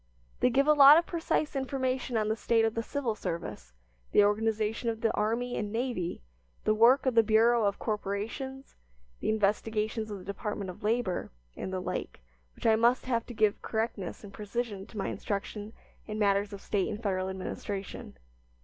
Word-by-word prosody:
They 250 - +4
give 275 +3 +3
a 300 - +6
lot 290 +1 +9
of 340 - +2
precise 325 -3 -1
information 260 -2 -1
on 215 -1 +1
the 215 - +1
state 225 0 +2
of 225 - 0
the 230 - -1
civil 250 -1 -2
service, 165 - -5 0.4
the 205 - +7
organization 220 +2 +1
of 225 -1 -4
the 225 - +2
army 230 +4 0
and 210 -1 -3
navy, 225 - -2 0.4
the 215 - +3
work 240 +5 +5
of 260 - +2
the 230 - +7
Bureau 225 +1 +4
of 200 -1 +1
Corporations, 220 +6 -4 0.5
the - - -2
investigations 215 +1 0
of 205 - -5
the 185 - -11
Department 200 -1 -4
of 180 - -15
Labor, 215 -3 -1 0.2
and 190 - -5
the 185 - -2
like, 185 - -4 0.4
which - - -11
I 225 -1 +6
must 235 +3 +3
have 235 -3 -1
to 240 - -8
give 215 -1 +2
correctness 220 -5 -3
and 200 -1 -10
precision 210 -1 -4
to 220 - -12
my 195 - -1
instruction 205 +1 -4 0.4
in 215 0 -4
matters 200 -1 +2
of 200 -1 -8
State 200 -3 0
and 215 +2 -5
Federal 190 -2 0
administration. 195 - -6
220 Hz, 185 wpm, -30 LUFS, 205-240 Hz, 0.5 s, lot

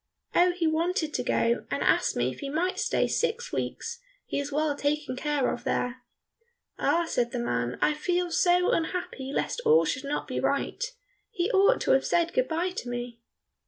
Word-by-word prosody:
"Oh, 355 +1 +5
he 350 -2 -1
wanted 320 0 0
to - - 0
go, 235 +1 +1
and - - -1
asked - - +2
me - - +1
if - - -11
he 280 - -4
might 340 +6 -1
stay - - +1
six 480 +1 -1
weeks, 470 +1 -4 0.3
he - - -2
is 285 +1 -4
well 300 0 +1
taken 285 -2 -1
care 290 0 0
of 245 - -7
there." 250 -1 -1 0.8
"Ah," 340 0 +2
said 240 -7 0
the 250 - -3
man, 125 - -1
"I 305 - +4
feel 355 +3 -1
so 355 +1 +3
unhappy 320 -5 -2
lest 480 - -1
all 465 +1 +5
should 265 +2 -2
not 285 +1 -2
be - - -2
right. - - -1 0.5
He 385 -1 -1
ought 400 +4 +4
to - - +2
have 270 - +4
said 340 0 +1
good - - +2
bye 340 +3 -1
to 245 - -4
me." 240 -1 -5
315 Hz, 195 wpm, -27 LUFS, 270-360 Hz, 0.8 s, Oh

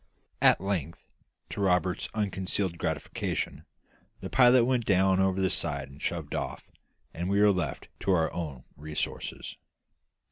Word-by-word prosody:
At - - +6
length, 85 -5 -3 0.5
to - - -4
Roberts's 90 -2 +1
unconcealed 95 -3 -1
gratification, 80 -4 -3 0.5
the - - -7
pilot 125 -1 +6
went 125 -1 +1
down 95 -2 +3
over 95 0 +2
the 95 0 +2
side 70 -7 -2
and 70 - -14
shoved - - -3
off, - - -4 0.4
and 85 +3 -3
we 100 +1 +2
were 105 0 +6
left 90 -3 -2
to 100 - 0
our 80 -3 +2
own 75 -7 -5
resources. 75 +1 -4
95 Hz, 140 wpm, -29 LUFS, 80-100 Hz, 0.5 s, At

